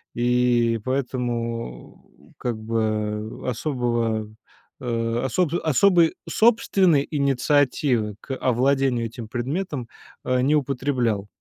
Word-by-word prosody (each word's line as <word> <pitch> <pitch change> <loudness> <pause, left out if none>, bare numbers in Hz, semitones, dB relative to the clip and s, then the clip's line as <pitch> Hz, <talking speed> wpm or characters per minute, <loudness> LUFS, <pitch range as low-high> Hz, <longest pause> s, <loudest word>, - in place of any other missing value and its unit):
и 120 -1 +2
поэтому 120 - -4
как 120 -3 -3
бы 110 -1 -2
особого 120 -4 -1 0.5
э, 115 -1 -1
особ 165 +5 0
особой 165 +2 +4
собственной 195 -9 +3
инициативы 135 -5 +1
к 135 - -6
овладению 130 -1 +1
этим 115 0 -9
предметом, 130 - -3 0.3
а, 125 0 +1
не 145 +4 +3
употреблял. 125 -7 0
125 Hz, 90 wpm, -23 LUFS, 115-140 Hz, 0.5 s, особой